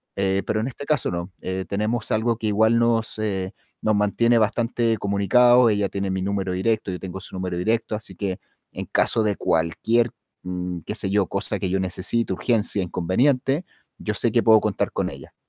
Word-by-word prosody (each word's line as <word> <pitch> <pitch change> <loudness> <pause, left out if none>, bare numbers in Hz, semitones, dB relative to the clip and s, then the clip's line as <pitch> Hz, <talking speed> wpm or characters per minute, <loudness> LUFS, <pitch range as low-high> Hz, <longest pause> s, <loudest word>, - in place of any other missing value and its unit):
eh, 95 0 0
pero 110 - 0
en 115 - -2
este 140 +2 -7
caso 150 - 0
no. 85 +1 -4
Eh, 95 0 -3
tenemos 110 +3 -1
algo 115 +1 +1
que 110 - -3
igual 110 +2 +3
nos, 115 -2 +1
eh, 95 -3 -2 0.3
nos 110 -1 +2
mantiene 115 +3 +2
bastante 115 +1 +1
comunicados. 115 +5 +4
Ella 100 -1 0
tiene 100 0 -3
mi 95 0 -2
número 95 -1 -1
directo, 110 +3 0
yo 90 - -5
tengo 95 0 -6
su 95 - -8
número 90 -1 -3
directo, 110 +4 0
así 105 -3 -7
que 95 0 -3 0.3
en - - -5
caso 110 - +2
de 105 -2 +1
cualquier, 95 +8 +1 0.3
mm, 90 -1 -4
qué - - -4
sé 95 - -1
yo, 100 -1 +2
cosa 100 0 -3
que 95 - -2
yo 95 +1 0
necesite, 95 +4 -1
urgencia, 105 -1 +1
inconveniente, 125 - +1 0.3
yo 105 - -3
sé 110 +3 +1
que 115 - +2
puedo 110 -2 +6
contar 105 -2 -1
con - - -1
ella. - - -12
105 Hz, 195 wpm, -23 LUFS, 95-115 Hz, 0.3 s, puedo